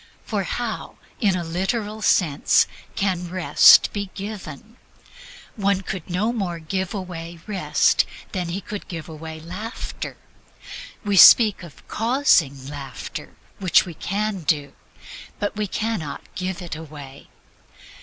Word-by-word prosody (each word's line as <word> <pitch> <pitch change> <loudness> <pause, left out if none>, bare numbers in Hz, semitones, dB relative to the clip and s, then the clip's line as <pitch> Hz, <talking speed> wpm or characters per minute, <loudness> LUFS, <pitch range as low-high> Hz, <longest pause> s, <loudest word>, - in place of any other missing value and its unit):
For - - -1
how, - - -4 0.2
in 200 -5 +2
a 175 - -2
literal 205 +6 -2
sense, 160 -8 +3 0.3
can 180 -3 -1
Rest 185 0 +6
be 200 -2 -3
given? 205 - -8 0.8
One 200 -2 +1
could 185 -3 -6
no 205 +7 0
more 190 -7 -2
give 185 +4 -3
away 170 -3 -6
Rest 200 -4 +2 0.2
than 180 -4 -3
he 185 +4 -3
could 205 +2 -7
give 165 -3 -6
away 160 0 -8
Laughter. 185 +8 -6 0.9
We 200 -1 +1
speak 215 +2 +8
of 170 -5 -13
"causing" 210 - +2
laughter, 140 -3 -7 0.2
which 185 -3 +4
we 175 - -7
can 205 +4 -2
do; 145 -3 0 0.6
but 205 - -2
we 210 0 -1
can 220 +2 -2
not 145 -3 -8
give 185 0 -4
it 170 - -5
away. 145 -3 -11
185 Hz, 130 wpm, -23 LUFS, 160-205 Hz, 0.9 s, speak